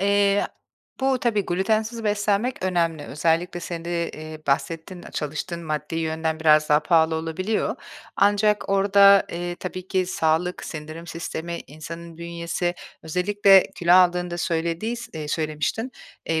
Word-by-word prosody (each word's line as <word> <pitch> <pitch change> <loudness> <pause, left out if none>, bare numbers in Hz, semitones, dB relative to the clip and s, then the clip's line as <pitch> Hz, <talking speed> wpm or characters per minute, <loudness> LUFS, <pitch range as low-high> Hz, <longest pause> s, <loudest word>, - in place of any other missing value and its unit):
eee, 200 0 +3 0.5
bu 265 -1 +2
tabii 210 -5 +1
glütensiz 220 +5 0
beslenmek 210 +2 0
önemli. 170 -4 0
Özellikle 165 +4 0
senin 170 -1 -6
de, 170 -1 -2
ııı, 155 0 -8
bahsettin, 165 +5 -2
çalıştığın 155 +3 -4
maddi 155 0 -3
yönden 160 0 -2
biraz 155 -1 +5
daha 150 +1 +5
pahalı 160 0 +3
olabiliyor. 165 +7 -2 0.4
Ancak 205 +1 +3
orada, 200 0 +6
eee, 175 0 -4
tabii 185 0 -6
ki 185 -2 +1
sağlık, 180 -1 0
sindirim 155 +2 -7
sistemi, 170 0 -5
insanın 165 +3 -9
bünyesi, 170 +1 -3 0.3
özellikle 195 +3 +4
kilo 175 0 +2
aldığında 180 -1 +4
söylediys 175 +9 -2
eee, 155 -2 -5
söylemiştin. 155 - -2 0.3
Eee, 160 -1 +1
175 Hz, 130 wpm, -24 LUFS, 160-200 Hz, 0.5 s, orada